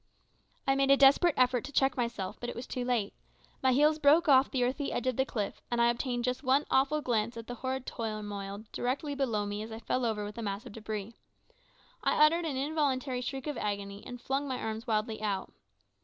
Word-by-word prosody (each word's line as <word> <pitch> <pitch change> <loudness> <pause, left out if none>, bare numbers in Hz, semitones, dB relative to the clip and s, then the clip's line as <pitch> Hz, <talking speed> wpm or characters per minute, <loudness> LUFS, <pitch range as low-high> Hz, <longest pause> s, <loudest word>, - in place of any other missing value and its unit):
I 270 - +3
made 275 0 +2
a 275 - +7
desperate 280 +5 +6
effort 250 -2 +3
to 285 - -8
check 270 -1 +2
myself, 235 -6 -3
but 240 - -4
it - - -6
was 240 - -6
too 250 - -4
late. 240 -5 0 0.5
My 260 - +4
heels 300 +4 +4
broke 310 +3 +5
off 270 -2 +6
the 255 -2 0
earthy 270 +3 -1
edge 245 - -2
of 255 -1 +1
the 265 +2 +1
cliff, 210 -4 -3
and 240 - 0
I 235 0 +5
obtained 245 0 -2
just 250 +1 -1
one 275 +1 +2
awful 280 +3 +3
glance 230 -2 -1
of 230 - -7
the 245 - -6
horrid 260 +1 -3
turmoil 210 -3 -5
directly 275 +4 -2
below 235 -7 0
me 205 +1 -4
as 220 +1 -7
I 220 - -5
fell 255 +2 -1
over 215 -3 -1
with 210 +3 -7
a - - -3
mass 205 +2 -4
of 245 - -10
debris. 215 0 -5 0.9
I - - +2
uttered 335 +2 +2
an 285 -5 -2
involuntary 270 -3 0
shriek 265 +1 -4
of 295 -4 -3
agony, 200 -1 -3
and 245 - -8
flung 275 +3 -2
my 260 -2 -2
arms 220 +2 -4
wildly 220 0 -1
out. 200 -3 -2
250 Hz, 220 wpm, -30 LUFS, 220-270 Hz, 0.9 s, a